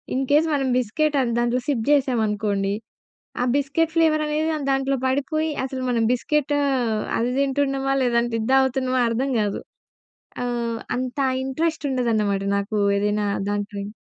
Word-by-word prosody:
In 265 +1 0
case 305 +3 +4
మనం 275 -2 +1
biscuit 290 +6 0
అది 240 -2 -1
దాంట్లో 240 +1 +1
సిప్ 265 -6 0
చేసామనుకోండి, 210 -7 +1 0.7
ఆ - - +2
బిస్కెట్ 285 +3 0
ఫ్లేవర్ 315 -2 +3
అనేది 305 +1 0 0.2
దాంట్లో 270 0 +1
పడిపోయి, 310 +4 0
అసలు 265 0 -5
మనం 230 -2 +1
బిస్కెట్ 295 +3 0 0.7
అది 240 +2 0
తింటున్నామా, 270 -1 0
లేదంటే 235 -1 +1
ఇది 220 - -3
తాగుతున్నామా 260 -1 +2
అర్థం 255 +4 -1
గాదు. 205 -1 -1 0.8
ఆహ్, 235 -2 -2 0.2
అంత 250 +1 -4 0.3
ఇంట్రెస్ట్ 310 +3 -2
ఉండదన్నమాట 220 -6 0
నాకు 200 +2 -3 0.2
ఏదైనా 210 +1 0 0.3
దాంట్లోని 205 0 -3
255 Hz, 130 wpm, -23 LUFS, 225-280 Hz, 0.8 s, case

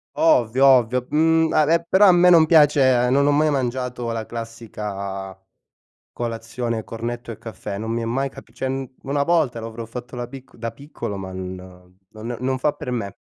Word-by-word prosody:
Ovvio, 130 -4 +3
ovvio. 125 -1 +4
Mhmm, 160 +1 +3
a 155 - +4
beh 170 +2 +2
però 200 +2 +6
a 185 - +8
me 180 0 +5
non 165 -2 +7
piace 140 -6 +5
non 140 +1 +3
ho 145 - +4
mai 155 +1 +3
mangiato 125 -3 -2
la 115 -1 -3
classica 105 -5 -6 0.8
colazione 115 0 -4
cornetto 120 +1 -5
e 110 - -7
caffè. 110 -3 -7
Non 110 +1 -4
mi 115 - -1
è - - -2
mai 135 +4 -1
cap - - -14
cioè, 130 - -3
mhmm, 135 0 -3 0.2
1 140 +1 -1
volta 150 -8 +1
l'avrò 115 +1 -7
fatto 125 +2 -8
la 120 - -4
picc 130 0 -12
da 115 0 -4
piccolo 115 -5 -7
ma 95 -1 -7
n 95 0 -5 0.6
non 115 +2 -6
non 130 +1 -1
fa 145 +3 +1
per - - -7
me. 115 -6 -4
125 Hz, 190 wpm, -22 LUFS, 115-140 Hz, 0.8 s, a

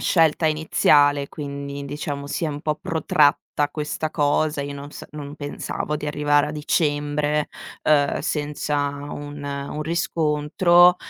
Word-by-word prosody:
scelta 160 -2 +3
iniziale, 145 -2 +3
quindi 140 -1 -6
diciamo 140 0 -4
si 155 - -2
è - - 0
un 145 -1 -5
po' 155 0 0
protratta 155 -3 +2 0.3
questa 155 +1 -3
cosa. 150 0 +1
Io 145 - -5
non 140 0 -8
sa - - -9
non 145 -1 -7
pensavo 150 0 -4
di 150 0 -5
arrivare 145 0 +2
a - - -4
dicembre, 150 0 0 0.3
ehm, 145 -2 +3
senza 150 -1 -2 0.3
un 145 0 -7
un 140 +1 -4
riscontro. 170 +2 +4
150 Hz, 135 wpm, -23 LUFS, 145-155 Hz, 0.3 s, riscontro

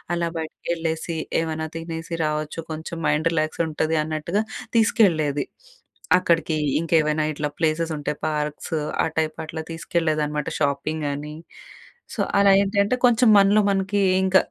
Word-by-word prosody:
అలా 170 -1 -1
బయటకెళ్ళేసి, 160 +1 -3 0.2
ఏమన్నా 160 -1 -3
తినేసి 165 0 -6
రావచ్చు. 155 +1 -2
కొంచెం 160 +1 -6
మైండ్ 155 +2 +2
రిలాక్స్ 155 0 -1
ఉంటది 160 +1 0
అన్నట్టుగా 160 +6 -1 0.3
తీసుకెళ్ళేది. 165 -10 +3 0.7
అక్కడికి 165 -3 +1 0.2
ఇంకేమైనా 155 -2 +2
ఇట్లా 150 0 -2
ప్లేసెస్ 160 0 0
ఉంటే 145 0 -2
పార్క్స్, 150 0 -3 0.3
ఆ - - +2
టైప్ 155 -1 0
అట్లా 160 0 -5
తీసుకెళ్ళలేదనమాట 155 -3 -1
షాపింగ్ 150 +2 -1
అని. 150 +2 -6 0.8
సో, - - -2 0.2
అలా 200 0 +6
ఏంటంటే 200 +3 +1
కొంచెం 240 0 +3
మనలో 200 +2 +5
మనకి 195 +1 0 0.2
ఇంక 190 0 +4
160 Hz, 125 wpm, -23 LUFS, 155-170 Hz, 0.8 s, అలా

